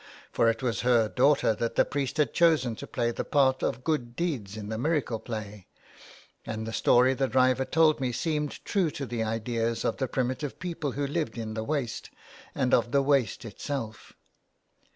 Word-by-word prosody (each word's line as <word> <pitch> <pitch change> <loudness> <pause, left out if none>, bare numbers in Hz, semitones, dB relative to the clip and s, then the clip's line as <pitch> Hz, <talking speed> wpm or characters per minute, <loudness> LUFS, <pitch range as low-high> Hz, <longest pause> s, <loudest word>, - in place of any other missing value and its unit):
For 115 - +3
it 115 +2 -2
was 120 -4 0
her 120 -3 +3
daughter 140 -1 +3
that 115 +2 -3
the - - +4
priest 140 -1 -3
had 150 - +1
chosen 155 -9 +3
to - - -8
play 120 -1 -1
the - - -3
part 130 -2 +2
of 125 - -2
Good 125 -7 -1
Deeds 120 - -3
in 105 -1 -6
the 110 - -3
miracle 145 -5 0
play, 105 -4 -7 0.8
and 110 0 -5
the 115 - -5
story 125 +3 +4
the 135 +1 0
driver 130 +2 +3
told 155 0 +3
me 130 -2 0
seemed 150 +3 -2
true 190 -5 +1
to 140 -1 -5
the 120 -2 -3
ideas 115 +1 -1
of - - 0
the 130 - -1
primitive 130 +3 -2
people 165 -6 -4
who 145 +1 -1
lived 150 -1 -2
in 110 -1 -4
the 110 0 -3
waste, 135 -3 -3 0.5
and 130 -2 0
of 120 - +3
the 140 -1 +3
waste 135 -5 +1
itself. 115 -1 -6
125 Hz, 190 wpm, -28 LUFS, 115-145 Hz, 0.8 s, the